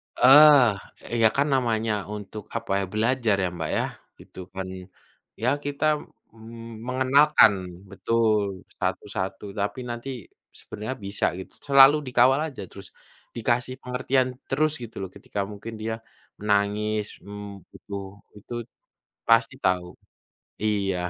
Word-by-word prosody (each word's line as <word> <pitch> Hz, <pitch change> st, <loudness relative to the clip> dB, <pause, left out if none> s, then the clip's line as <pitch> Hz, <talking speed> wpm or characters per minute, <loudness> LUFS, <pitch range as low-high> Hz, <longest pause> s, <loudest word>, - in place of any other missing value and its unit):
Eee, 130 Hz, -5 st, +5 dB
ya, 110 Hz, -, +7 dB
kan, 140 Hz, +2 st, +2 dB
namanya 115 Hz, -4 st, +1 dB, 0.2 s
untuk 105 Hz, 0 st, -8 dB
apa, 115 Hz, -3 st, -6 dB
ya, -, -, -1 dB
belajar, 115 Hz, -1 st, +2 dB
ya, -, -, +1 dB
Mbak, 80 Hz, -2 st, -4 dB
yah -, -, -1 dB, 0.3 s
gitu, -, -, -14 dB
kan. 95 Hz, -1 st, -5 dB, 0.8 s
Ya, 125 Hz, -, +3 dB, 0.2 s
kita, 145 Hz, +1 st, -2 dB, 0.5 s
mmm, 115 Hz, +1 st, -11 dB
mengenalkan 130 Hz, -2 st, +5 dB, 0.4 s
betul, 105 Hz, -2 st, 0 dB, 0.2 s
satu-satu 95 Hz, +2 st, -3 dB
tapi 100 Hz, +6 st, -2 dB
nanti 120 Hz, +3 st, -5 dB, 0.5 s
sebenarnya 110 Hz, +6 st, -6 dB
bisa 100 Hz, +1 st, -1 dB
gitu, 95 Hz, -, -10 dB
selalu 140 Hz, +1 st, +8 dB
dikawal 125 Hz, +2 st, +4 dB
aja 135 Hz, -, -9 dB
terus 100 Hz, -1 st, -11 dB, 0.5 s
dikasih 120 Hz, +2 st, 0 dB
pengertian 125 Hz, +1 st, 0 dB, 0.2 s
terus 155 Hz, +3 st, +2 dB
gitu 115 Hz, -, -9 dB
loh 95 Hz, -, -5 dB
ketika 105 Hz, -, -7 dB
mungkin 105 Hz, +3 st, -8 dB
dia 110 Hz, +1 st, -2 dB, 0.5 s
menangis, 105 Hz, +1 st, +1 dB, 0.2 s
mmm, 100 Hz, -1 st, -9 dB
butuh 100 Hz, -1 st, -8 dB, 0.3 s
itut 120 Hz, +3 st, -7 dB, 0.6 s
pasti 115 Hz, +2 st, +4 dB
tahu, 90 Hz, -1 st, +2 dB, 0.8 s
iya. 100 Hz, -3 st, 0 dB
115 Hz, 120 wpm, -25 LUFS, 100-130 Hz, 0.8 s, selalu